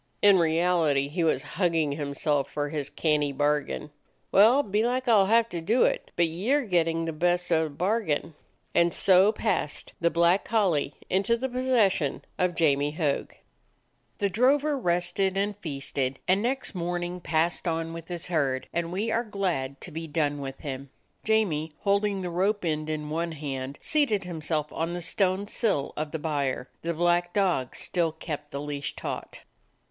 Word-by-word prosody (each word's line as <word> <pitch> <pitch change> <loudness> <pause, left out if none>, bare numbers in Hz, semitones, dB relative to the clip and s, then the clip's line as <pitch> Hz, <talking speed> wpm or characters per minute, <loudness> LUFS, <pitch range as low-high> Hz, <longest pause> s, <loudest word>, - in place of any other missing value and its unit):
In 200 -2 +7
reality 160 -4 +2
he 170 +3 -1
was 155 -4 +1 0.2
hugging 165 -4 +2
himself 145 0 -1
for 145 -1 -2
his 145 -2 -3
canny 150 -3 +1
bargain. 145 +1 -1 0.4
"Well, 230 +8 +6
belike 240 +5 0
I 235 - +5
'll 200 -3 +6
have 230 +2 +4
to 170 - -4
do 220 +9 +3
it, - - 0
but 170 -1 +3
ye 180 +10 -3
're 290 +1 +4
getting 165 -4 +1
the 165 - -3
best 175 +2 0
of 160 -1 +4
the - - -5
bargain." 170 -1 -1 0.4
And 170 0 +4
so 190 +2 +5
passed 210 -9 -2
the 170 - +4
black 170 +3 +3
collie 185 -10 +1
into 200 +5 +1
the 260 +3 -2
pos 255 0 -3
session 195 - +2
of 180 -1 +1
Jamie 145 -3 +2
Hogg. 150 -3 -1 0.8
The 200 - +1
drover 270 +9 +2
rested, 180 -2 0 0.2
feasted, 135 -4 -2
and 190 +2 +3
next 260 +4 -1
morn 175 -1 -2
ing 175 +1 -4
passed 170 +1 0
on 165 0 -1
with 165 -1 -8
his 175 -2 -5
herd, 140 -7 0
and 170 0 -1
we 210 +5 -1
are 230 +2 +1
glad 180 - -2
to - - -7
be 165 +1 -5
done 145 -2 -1
with 135 -1 -7
him. 135 -1 -6 0.3
Jamie, 190 -9 +1
holding 200 -1 +1
the 180 -1 -4
rope 195 +3 0
end 155 -1 -1
in 150 -1 -3
one 165 +1 -2
hand, 140 -2 -5
seated 280 -10 +1
himself 155 -3 -3
'on 165 +2 -2
the 175 - -4
stone 190 +3 +1
sill 205 - -1
of 155 0 -3
the 160 - -2
byre; 145 -4 -2
the 170 0 -2
black 175 +1 +1
dog 180 -11 +1
still 170 -3 0
kept 150 -2 -6
the 140 -2 -5
leash 145 -1 -4
taut. - - -6
170 Hz, 175 wpm, -27 LUFS, 150-195 Hz, 0.8 s, In